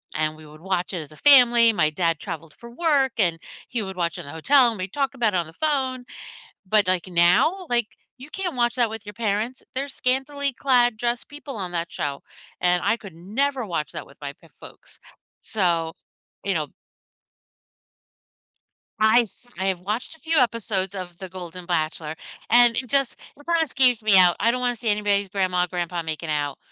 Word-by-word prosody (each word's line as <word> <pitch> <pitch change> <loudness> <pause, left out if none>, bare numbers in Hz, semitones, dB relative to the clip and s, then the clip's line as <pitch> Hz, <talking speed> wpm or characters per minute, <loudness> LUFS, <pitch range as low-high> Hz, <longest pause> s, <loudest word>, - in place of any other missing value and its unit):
and 155 0 0
we 155 - -14
would 155 +1 -15
watch 185 0 -2
it 175 - -2
as 150 0 -11
a 155 - -15
family, 240 -5 +7
my 155 -5 +2
dad 165 -1 0
traveled 160 -1 -7
for 235 - -12
work, 280 -3 +1
and 170 -5 +1 0.3
he 235 -3 -2
would 190 -1 -6
watch 170 -2 -1
in - - -7
the 140 - -8
hotel 245 - +4
and 225 - -5
we'd 185 +1 -5
talk 275 -1 -1
about 225 -5 +1
it - - +2
on 170 -2 -1
the 160 - -14
phone, 265 - -1 0.6
but, 210 -1 +3
like, 185 0 +1
now, 185 - +3
like, 240 -3 +1 0.3
you 265 +4 -12
can't 365 -7 -3
watch 240 0 +1
that 240 -3 +2
with 220 -1 -8
your 210 - -8
parents 225 +2 -2
they're 275 +2 -2
scantily 275 +2 -1
clad 245 -3 +2
dressed 240 +1 -2
people 290 -3 -9
on 185 -3 -5
that 170 -1 -3
show, 140 -1 -3 0.4
and 180 0 +3
I 230 - +2
could 200 -6 -11
never 240 +8 -1
watch 160 -4 -3
that 155 -4 -6
with 140 - -19
my 140 0 -5
p 165 - -18
folks. - - -13 0.4
So, 170 -5 0 0.5
you 195 - +1
know 155 -2 -1 2.3
I 220 +3 +6
s 235 +2 -10
I 190 - -1
have 185 -2 0
watched 215 - -4
a - - -27
few 320 0 +1
episodes 210 -6 0
of 180 -2 -7
The 190 - -7
Golden 180 -1 -9
Bachelor, 155 -2 -2 0.4
and 240 0 +6
it 255 - -2
just 275 -1 +1 0.2
it 290 - -18
kinda 335 -1 +2
scares 255 -4 +3
me 210 -3 +5
out 180 -1 +6
I 230 - +4
don't 250 +1 -1
wanna 245 -1 0
see 230 -1 -4
anybody's 205 -1 +1
grandma 185 -2 0
or - - -4
grandpa 175 -1 -3
making 160 0 -4
out, 145 -2 -2
205 Hz, 200 wpm, -23 LUFS, 175-250 Hz, 2.3 s, family